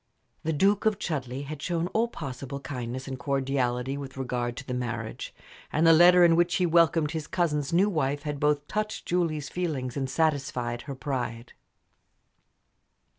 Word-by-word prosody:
The 160 Hz, -, -1 dB
Duke 195 Hz, +7 st, +3 dB
of 215 Hz, -2 st, +2 dB
Chudleigh 135 Hz, -7 st, -3 dB
had 150 Hz, 0 st, -7 dB
shown 170 Hz, -1 st, -1 dB
all 225 Hz, +4 st, +1 dB
possible 140 Hz, -, -6 dB
kindness 130 Hz, -2 st, -5 dB
and 130 Hz, -1 st, -5 dB
cordiality 135 Hz, 0 st, -1 dB
with 135 Hz, -1 st, -8 dB
regard 125 Hz, -2 st, -2 dB
to 130 Hz, -, -7 dB
the 125 Hz, -, -4 dB
marriage, 120 Hz, -2 st, -4 dB, 0.4 s
and 155 Hz, +2 st, +2 dB
the 165 Hz, -, +8 dB
letter 175 Hz, +2 st, +7 dB
in 165 Hz, -1 st, +5 dB
which 175 Hz, +1 st, +2 dB
he 180 Hz, -, +2 dB
welcomed 165 Hz, -2 st, +3 dB
his 160 Hz, -2 st, -4 dB
cousin's 150 Hz, -6 st, 0 dB
new 180 Hz, +4 st, +4 dB
wife 145 Hz, -6 st, -1 dB
had 150 Hz, -2 st, -3 dB
both 150 Hz, 0 st, +1 dB
touched 215 Hz, +1 st, -3 dB
Julie's 160 Hz, -5 st, -1 dB
feelings 145 Hz, -9 st, -3 dB
and 135 Hz, -2 st, -2 dB
satisfied 135 Hz, -6 st, 0 dB
her 140 Hz, -2 st, -7 dB
pride. 125 Hz, -4 st, -4 dB
145 Hz, 165 wpm, -27 LUFS, 130-165 Hz, 0.4 s, the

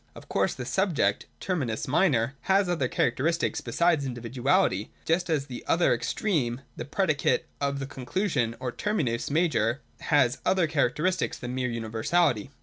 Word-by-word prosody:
Of -, -, -12 dB
course -, -, 0 dB
the 125 Hz, -, -6 dB
subject 155 Hz, -, +1 dB
{terminus 135 Hz, -, -2 dB
minor) 130 Hz, -5 st, +2 dB, 0.2 s
has 195 Hz, 0 st, +4 dB
other 165 Hz, -7 st, 0 dB
characteristics 160 Hz, +8 st, 0 dB
besides 170 Hz, -4 st, +2 dB
individuality, 120 Hz, -4 st, 0 dB, 0.2 s
just 175 Hz, +2 st, +1 dB
as 150 Hz, -4 st, +1 dB
the 125 Hz, -3 st, -8 dB
other 170 Hz, +1 st, +3 dB
extreme 130 Hz, -, -1 dB
(the -, -, -5 dB
predicate 155 Hz, -1 st, +1 dB, 0.2 s
of 140 Hz, 0 st, 0 dB
the 135 Hz, -, -3 dB
conclusion, 135 Hz, -, -1 dB
or 125 Hz, -1 st, -3 dB
terminus 135 Hz, -, -1 dB
■major) 145 Hz, -7 st, +1 dB, 0.2 s
has 145 Hz, -5 st, +2 dB
other 185 Hz, -3 st, +3 dB
characteristics 155 Hz, +4 st, 0 dB
than 125 Hz, 0 st, -5 dB
mere 125 Hz, -1 st, -1 dB
universality. 115 Hz, +3 st, 0 dB
140 Hz, 145 wpm, -27 LUFS, 120-170 Hz, 0.2 s, has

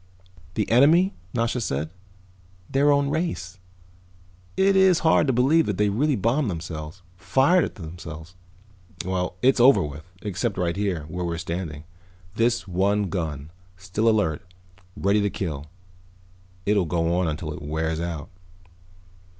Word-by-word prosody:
"The 105 Hz, -, 0 dB
enemy," 160 Hz, +10 st, +5 dB, 0.2 s
Nasha 115 Hz, +3 st, -1 dB
said. 75 Hz, -5 st, -2 dB, 0.8 s
"Their 140 Hz, +2 st, +3 dB
own 140 Hz, 0 st, +2 dB
race. 145 Hz, -, -3 dB, 1.0 s
It 195 Hz, +1 st, +4 dB
is 190 Hz, -2 st, +5 dB
hard 160 Hz, -, +4 dB
to -, -, +3 dB
believe 140 Hz, +7 st, +3 dB
that 105 Hz, -3 st, -1 dB
they 105 Hz, 0 st, +2 dB
really 140 Hz, +8 st, +1 dB
bombed 115 Hz, +5 st, +1 dB
themselves, 80 Hz, 0 st, -6 dB
fired 140 Hz, -, +3 dB
at -, -, -4 dB
themselves." 80 Hz, -2 st, -9 dB, 0.7 s
"Well, 90 Hz, -1 st, -2 dB
it's 130 Hz, 0 st, +4 dB
over 130 Hz, +3 st, +6 dB
with. 75 Hz, +4 st, -8 dB
Except 105 Hz, +1 st, -2 dB
right 85 Hz, -2 st, 0 dB
here, 95 Hz, -6 st, -1 dB
where 85 Hz, +4 st, -5 dB
we're 85 Hz, -1 st, -2 dB
standing. 85 Hz, -3 st, -5 dB, 0.5 s
This 115 Hz, -1 st, +1 dB
one 100 Hz, +2 st, +1 dB
gun, 80 Hz, -5 st, -4 dB, 0.3 s
still 95 Hz, +5 st, 0 dB
alert, 85 Hz, -9 st, +1 dB, 0.6 s
ready 100 Hz, +2 st, +2 dB
to 100 Hz, -, +1 dB
kill. 75 Hz, -8 st, -4 dB, 1.0 s
It'll 100 Hz, -3 st, +2 dB
go 85 Hz, 0 st, 0 dB
on 90 Hz, -, +1 dB
until 75 Hz, 0 st, -3 dB
it -, -, -9 dB
wears 80 Hz, +2 st, -2 dB
out." 85 Hz, -1 st, -4 dB
95 Hz, 140 wpm, -24 LUFS, 80-120 Hz, 1.0 s, over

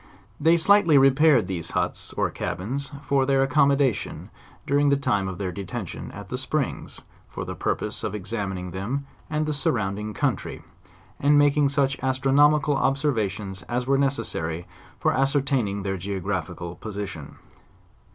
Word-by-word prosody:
They 165 Hz, +3 st, +5 dB
slightly 170 Hz, -3 st, +5 dB
repaired 135 Hz, -2 st, +5 dB
these 85 Hz, -4 st, -4 dB
huts, -, -, -2 dB
or -, -, 0 dB
cabins, 130 Hz, -, -4 dB
for 135 Hz, -1 st, +2 dB
tneir 135 Hz, 0 st, +3 dB
ac 135 Hz, -, -7 dB
commodation 140 Hz, -4 st, +2 dB, 0.3 s
during 145 Hz, 0 st, +3 dB
the 140 Hz, -, +3 dB
time 125 Hz, -9 st, 0 dB
of 95 Hz, -1 st, -5 dB
their 95 Hz, -2 st, -3 dB
detention 100 Hz, +2 st, -6 dB
at -, -, -10 dB
the -, -, -3 dB
springs, -, -, -3 dB, 0.3 s
for -, -, -6 dB
the -, -, -5 dB
purpose -, -, -2 dB
of 105 Hz, -, -2 dB
examining 95 Hz, -3 st, -4 dB
them 115 Hz, +10 st, -3 dB, 0.2 s
and 155 Hz, 0 st, 0 dB
the 155 Hz, -, -1 dB
surrounding 105 Hz, -6 st, -1 dB
coun -, -, +1 dB
try; -, -, -8 dB, 0.6 s
and 145 Hz, +1 st, +4 dB
making 145 Hz, 0 st, +4 dB
such 140 Hz, -1 st, +1 dB
astronomical 140 Hz, +3 st, +3 dB
observations 110 Hz, -, -1 dB
as 120 Hz, +1 st, -1 dB
were 135 Hz, +1 st, +2 dB
ne 140 Hz, -, +4 dB
cessary 85 Hz, -10 st, -3 dB, 0.3 s
for -, -, +2 dB
ascertaining 135 Hz, -7 st, +1 dB
their 95 Hz, -1 st, -2 dB
geographical 90 Hz, -2 st, -4 dB
position. 105 Hz, 0 st, -6 dB
130 Hz, 150 wpm, -25 LUFS, 100-140 Hz, 0.6 s, They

